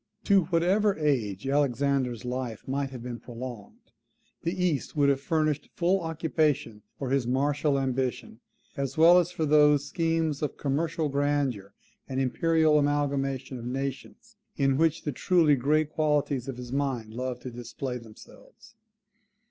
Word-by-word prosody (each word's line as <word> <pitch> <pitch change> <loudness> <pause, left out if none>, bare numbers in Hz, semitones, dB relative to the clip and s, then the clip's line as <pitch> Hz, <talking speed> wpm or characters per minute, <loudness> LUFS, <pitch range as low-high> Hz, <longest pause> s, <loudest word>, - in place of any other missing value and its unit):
To 195 -4 +4
whatever 190 +5 +2
age 125 -9 -1
Alexander's 135 -3 0
life 125 -3 -4
might 135 +1 -1
have 125 -3 -9
been 120 -1 -6
prolonged, 120 -3 -9 0.5
the 170 - -1
East 155 -5 -1
would 145 -2 +3
have 135 -1 +1
furnished 155 -1 0
full 180 +3 +2
occupation 155 -8 -1 0.2
for 135 -2 -4
his 135 -3 +1
martial 145 +3 +1
ambition, 130 -3 -2 0.4
as 140 +1 -3
well 170 +3 +7
as 175 -1 0
for 160 -3 -2
those 150 -1 +4
schemes 165 -1 -1
of 150 - -3
commercial 155 +3 -1
grandeur 140 -8 -1 0.3
and 130 0 -2
imperial 155 +3 +3
amalgamation 140 -3 -1
of 115 - -8
nations, 135 +1 -5 0.2
in 135 -1 +2
which 160 +2 +1
the 150 - -2
truly 160 +1 +3
great 150 +4 +1
qualities 145 -4 0
of 135 -2 -5
his 125 -1 -8
mind 130 -6 -2
loved 125 0 -4
to 125 - -6
display 120 +2 -5
themselves. 115 - -16
140 Hz, 145 wpm, -27 LUFS, 130-155 Hz, 0.5 s, well